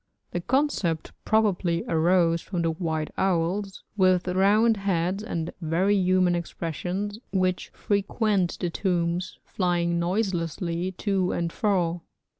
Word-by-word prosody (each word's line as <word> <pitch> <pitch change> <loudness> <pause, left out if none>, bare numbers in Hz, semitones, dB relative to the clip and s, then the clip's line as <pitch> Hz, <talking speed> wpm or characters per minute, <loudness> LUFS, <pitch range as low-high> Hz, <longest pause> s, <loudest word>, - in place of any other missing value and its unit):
The 175 - -2
concept 220 - 0
probably 190 -6 +2
arose 165 0 +3
from 175 -4 -3
the 165 - +1
white 160 -2 -2
owls, 190 +2 0
with 185 -2 +3
round 205 +5 +3
heads 190 0 0
and 170 -6 -4
very 175 +5 +2
human 185 -2 +3
expressions, 180 +4 -3
which 185 -2 0
frequent 200 -2 0
the 175 -2 -2
tombs, 175 0 -1
flying 175 -2 0
noiselessly 175 -1 -1
to 190 -1 0
and 170 -1 -2
fro. 175 -5 0
180 Hz, 115 wpm, -26 LUFS, 170-195 Hz, -, arose